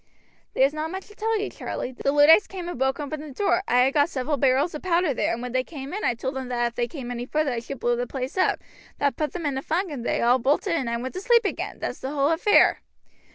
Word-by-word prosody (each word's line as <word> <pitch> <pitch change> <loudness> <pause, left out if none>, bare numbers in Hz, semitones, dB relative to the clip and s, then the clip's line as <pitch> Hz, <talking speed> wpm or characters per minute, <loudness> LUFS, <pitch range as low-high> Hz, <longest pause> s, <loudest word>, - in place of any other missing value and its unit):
"There 265 - +5
is 280 - 0
not 310 +1 -3
much 380 +2 -6
to 420 - -15
tell 445 +1 0
you, 410 - -3
Charlie. 250 - -5
The 270 +2 -1
Luddites 295 +7 +6
came 365 -3 -7
and 350 - -4
broke 265 +1 +1
open 295 +1 -4
the 300 -3 -9
door. 370 +3 +1
I 245 +1 +4
had 265 +2 +3
got 290 +1 +3
several 290 0 -1
barrels 275 +4 +2
of 300 - -6
powder 345 -4 +1
there, - - 0
and 235 +1 -3
when 250 - -4
they 255 +1 +1
came 280 0 -8
in 415 - -4
I 240 - +1
told 260 +4 -4
them 260 -1 -5
if 240 -1 0
they 240 0 -1
came 255 -4 -7
any 245 0 -5
further 305 -1 0
I 240 - -2
should 245 +3 -8
blow 240 0 +1
the 245 +1 -3
place 260 +1 -5
up. 375 - +2 0.4
That 285 -1 +1
put 305 -1 -2
them 345 -3 -5
in 275 -2 -1
a - - -6
funk, 340 +5 -1
and 265 -5 -5
they - - 0
all 245 +2 +4
bolted, 290 - +1
and 265 -8 -1
I 235 - -1
went 255 +2 -5
to 370 - -5
sleep 470 +1 +4
again. - - -3
That's - - -4
the 265 - -4
whole 280 0 +1
affair." 360 +6 +4
280 Hz, 285 wpm, -25 LUFS, 255-335 Hz, 0.4 s, Luddites